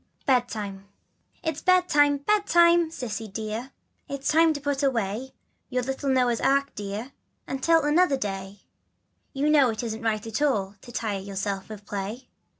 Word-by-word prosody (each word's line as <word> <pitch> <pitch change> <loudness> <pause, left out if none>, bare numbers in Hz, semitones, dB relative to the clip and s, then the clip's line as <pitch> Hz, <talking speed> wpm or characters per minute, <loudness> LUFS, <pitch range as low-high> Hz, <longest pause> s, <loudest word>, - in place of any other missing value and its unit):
BEDTIME. 215 -7 -1 0.6
/T'S 320 -3 -3
bedtime, 295 -6 +4
bedtime, 345 -5 +4
Cissy 230 -8 -5
dear, 215 +5 -5 0.4
It's 275 0 -2
time 325 +1 +5
to 290 - -4
put 285 -1 -1
away, 245 -2 -1 0.4
Your 250 -1 -1
little 270 +2 -2
Noah's 250 -3 +2
ark 275 +1 +2
dear 205 +5 -5 0.4
Until 320 +4 +2
another 295 0 +3
day, 195 -3 -5 0.7
You 275 +2 -1
know 295 -4 +5
it 220 +1 -3
isn't 225 -1 -4
right 220 -2 -1
at 225 +4 -3
all 205 -10 +1
To 240 - -12
tire 215 -4 -2
yourself 195 0 -4
with 210 -2 -9
play. 205 +6 -5
250 Hz, 150 wpm, -26 LUFS, 210-290 Hz, 0.7 s, time